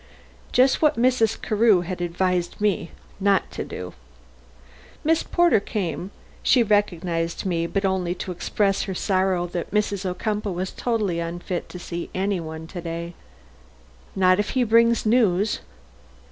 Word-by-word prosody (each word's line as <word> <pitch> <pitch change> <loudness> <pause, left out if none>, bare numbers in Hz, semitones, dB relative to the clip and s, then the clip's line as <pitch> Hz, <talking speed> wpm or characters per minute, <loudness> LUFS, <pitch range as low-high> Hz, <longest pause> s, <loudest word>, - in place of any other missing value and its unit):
Just 260 +2 +4
what 305 -3 +3
Mrs. 235 -2 +2
Carew 215 -3 +3
had 180 0 -5
advised 175 0 -1
me 205 -5 0 0.3
not 200 0 +2
to - - -4
do. - - -7 1.1
Miss 320 +1 +3
Porter 345 - +3
came. 190 -3 -3 0.3
She 245 - +4
recognized 175 -6 0
me, 170 -3 0
but 195 +3 -1
only 185 -2 0
to 185 - -5
express 195 +3 0
her 190 - -4
sorrow 185 -2 +1
that 175 -1 -4
Mrs. 205 -2 0
Ocumpaugh 205 +2 -2
was 185 +2 -3
totally 215 -8 -1
unfit 175 +1 -4
to - - -8
see 175 -1 -6
any 195 0 0
one 160 -1 -7
to 175 +2 -7
day. 170 0 -5 1.0
"Not 185 0 +4
if 205 - 0
he 255 - +4
brings 230 0 +4
news?" 215 -3 +2
190 Hz, 145 wpm, -24 LUFS, 175-215 Hz, 1.1 s, Just